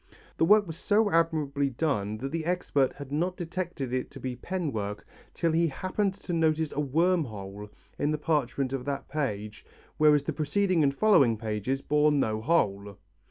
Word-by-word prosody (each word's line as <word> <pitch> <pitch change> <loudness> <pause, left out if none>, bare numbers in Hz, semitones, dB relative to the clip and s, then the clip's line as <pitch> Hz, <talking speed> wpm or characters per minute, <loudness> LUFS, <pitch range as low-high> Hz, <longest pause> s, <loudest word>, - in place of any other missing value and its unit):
The 165 - +3
work 210 +3 +6
was 165 -2 -7
so 210 0 +2
admirably 150 -4 +1
done 115 -7 -1
that 135 +4 -5
the 165 0 -2
expert 155 -6 +1
had 140 -1 -10
not 175 +5 -1
detected 175 -7 -4
it 130 0 -2
to - - -11
be 130 -1 -4
pen 170 +4 -3
work, 105 -1 -4 0.3
till 165 -1 +1
he 165 +1 +3
happened 190 +6 -1
to 190 -3 -6
notice 160 -2 +1
a - - -4
worm 165 +4 +2
hole 105 -2 -8 0.3
in 145 - +1
the 155 - 0
parchment 140 -3 -1
of 130 -2 -3
that 140 -1 -3
page 105 -8 -3 0.4
whereas 150 -2 +5
the - - -3
preceding 175 +3 +1
and 140 -2 +2
following 140 - +4
pages 110 +5 -2
bore 150 +1 +3
no 110 -7 0
hole. 100 -9 0
145 Hz, 180 wpm, -28 LUFS, 125-165 Hz, 0.4 s, work